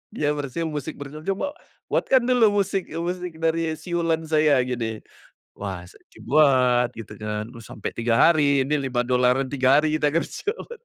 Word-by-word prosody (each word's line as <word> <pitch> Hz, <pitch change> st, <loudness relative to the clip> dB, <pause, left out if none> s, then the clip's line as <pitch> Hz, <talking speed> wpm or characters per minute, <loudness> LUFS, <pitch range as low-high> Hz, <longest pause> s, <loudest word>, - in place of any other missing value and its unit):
iya, 150 Hz, -6 st, +1 dB
bersiul, 150 Hz, +3 st, -3 dB
"musik 150 Hz, +1 st, -5 dB
bersiul, 150 Hz, +3 st, -9 dB
coba 200 Hz, +9 st, -1 dB, 0.4 s
buatkan 260 Hz, -2 st, +3 dB
dulu 225 Hz, -5 st, +3 dB
musik 195 Hz, -1 st, -3 dB
musik 175 Hz, 0 st, -4 dB
dari 165 Hz, 0 st, 0 dB
siulan 165 Hz, 0 st, -1 dB
saya 155 Hz, -4 st, +3 dB
gini." 115 Hz, -3 st, -4 dB, 0.5 s
Wah, 95 Hz, -3 st, -5 dB
saya -, -, -20 dB
coba -, -, -15 dB
buat 130 Hz, -4 st, +4 dB
gitu 105 Hz, -, -11 dB
kan, 105 Hz, 0 st, -4 dB
terus 115 Hz, -2 st, -12 dB
sampai 105 Hz, -, -6 dB
3 115 Hz, 0 st, 0 dB
hari, 140 Hz, +1 st, +4 dB
nih 150 Hz, -, +2 dB
5 125 Hz, -2 st, 0 dB
dolaran 125 Hz, +2 st, +2 dB
3 135 Hz, 0 st, +4 dB
hari 155 Hz, 0 st, 0 dB
kita 150 Hz, -1 st, 0 dB
kerja, 170 Hz, -, -2 dB, 0.2 s
betul. 475 Hz, -, -9 dB
150 Hz, 170 wpm, -24 LUFS, 125-165 Hz, 0.5 s, buat